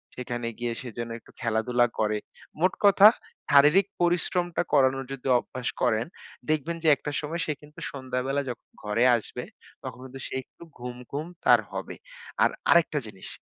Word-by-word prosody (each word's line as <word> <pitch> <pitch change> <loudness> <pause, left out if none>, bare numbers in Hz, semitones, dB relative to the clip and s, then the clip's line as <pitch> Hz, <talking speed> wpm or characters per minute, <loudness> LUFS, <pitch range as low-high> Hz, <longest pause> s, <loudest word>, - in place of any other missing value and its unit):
সেখানে 120 -1 -4
গিয়ে 120 -1 -1
সে 125 - -7
যেন 115 0 -3
একটু - - -20
খেলাধুলা 120 +2 +2
করে। 105 -1 +1 0.4
মোট 185 +2 +3
কথা, 200 +1 +9 0.4
শারীরিক 150 +8 +6
পরিশ্রমটা 175 0 +1
করানোর 135 0 +3
যদি 135 -1 -7
অভ্যাস 125 0 -6
করেন, 115 -2 +2 0.4
দেখবেন 155 +2 0
যে - - +2
একটা 145 - -6
সময় 160 +3 -3
সে 155 - -1
কিন্তু 150 0 -14
সন্ধ্যাবেলা 130 +1 -2
যখন 120 - -7 0.2
ঘরে 105 +3 +1
আসবে, 110 - -5 0.4
তখন - - -7
কিন্তু 130 +1 -9
সে - - -8
একটু - - -17 0.2
ঘুম, 125 0 -6 0.2
ঘুম 150 +3 -3 0.2
তার - - +7
হবে। - - -5 0.5
আর - - +5 0.2
আরেকটা 160 -3 +4
জিনিস! 95 -3 -9
130 Hz, 160 wpm, -27 LUFS, 120-155 Hz, 0.5 s, কথা